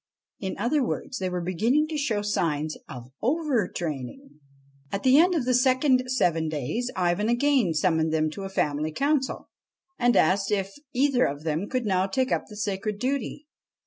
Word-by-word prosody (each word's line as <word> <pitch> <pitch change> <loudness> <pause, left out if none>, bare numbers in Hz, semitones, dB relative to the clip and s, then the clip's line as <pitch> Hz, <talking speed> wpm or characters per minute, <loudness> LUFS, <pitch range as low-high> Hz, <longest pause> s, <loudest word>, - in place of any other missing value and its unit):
In 190 -2 -4
other 280 +4 +1
words, 255 - -3
they 185 -1 -1
were 180 0 -3
beginning 230 - +1
to 315 - -4
show 235 -8 -1
signs 155 -6 -1
of 125 -1 -9
over 265 - +1
training. 160 - -6 0.5
At 195 - -3
the 260 +2 +6
end 355 +2 +4
of 285 -7 0
the 255 - +2
second 255 0 +3
seven 170 -10 +1
days 155 - -2
Ivan 180 +4 +1
again 240 - +2
summoned 160 -1 +2
them 155 -1 +1
to 195 - -7
a 195 - -5
family 155 -4 -1
council, 275 - -1 0.5
and 240 0 +3
asked 195 +4 +3
them 205 -2 +2
if 195 - -16 0.2
either 260 -1 +2
of 145 +2 -3
them 160 +5 -2
could 255 -2 -1
now 190 -2 +1
take 255 +6 0
up - - 0
the 210 - -11
sacred 205 0 -2
duty. 270 +4 -3
210 Hz, 180 wpm, -26 LUFS, 170-260 Hz, 0.5 s, the